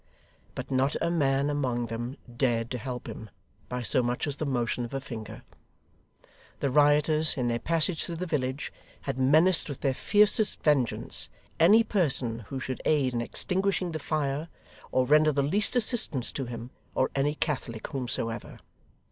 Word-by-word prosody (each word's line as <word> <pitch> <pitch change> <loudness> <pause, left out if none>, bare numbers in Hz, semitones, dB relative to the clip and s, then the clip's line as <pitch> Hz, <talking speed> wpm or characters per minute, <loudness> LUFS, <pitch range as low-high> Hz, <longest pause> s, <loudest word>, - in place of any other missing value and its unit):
But - - -6
not 135 +2 +1
a 170 - 0
man 140 -4 +1
among 125 -5 -1
them 120 +4 -5 0.2
dared 120 -3 0
to 125 - -3
help 125 +1 -6
him 110 - -8 0.4
by 125 0 -3
so 125 - +3
much 120 0 -1
as 145 -1 -2
the 155 - -3
motion 120 -2 -1
of 120 +3 -6
a - - -1
finger. 115 -5 -8 1.2
The 140 - 0
rioters, 150 +2 +4
in 125 -2 0
their 120 0 -1
passage 165 +2 0
through 170 - -5
the 180 +3 -4
village, 140 -4 -3 0.3
had 135 -1 -4
menaced 160 +7 +4
with 140 - -7
their 135 -2 +1
fiercest 210 - +2
vengeance, 140 -6 +1 0.3
any 205 +8 +6
person 135 - +1
who 135 - -5
should 130 0 -5
aid 140 -5 +2
in 120 - -1
extinguishing 185 +6 -1
the 160 - -4
fire, 150 0 -2 0.4
or 130 - +2
render 155 +3 +5
the 140 -1 0
least 200 - +1
assistance 215 - +3
to 135 - -4
him, 120 +1 -7 0.2
or 130 - +1
any 145 +2 0
Catholic 125 -8 -3
whomsoever. 120 -3 -4
135 Hz, 165 wpm, -28 LUFS, 125-155 Hz, 1.2 s, any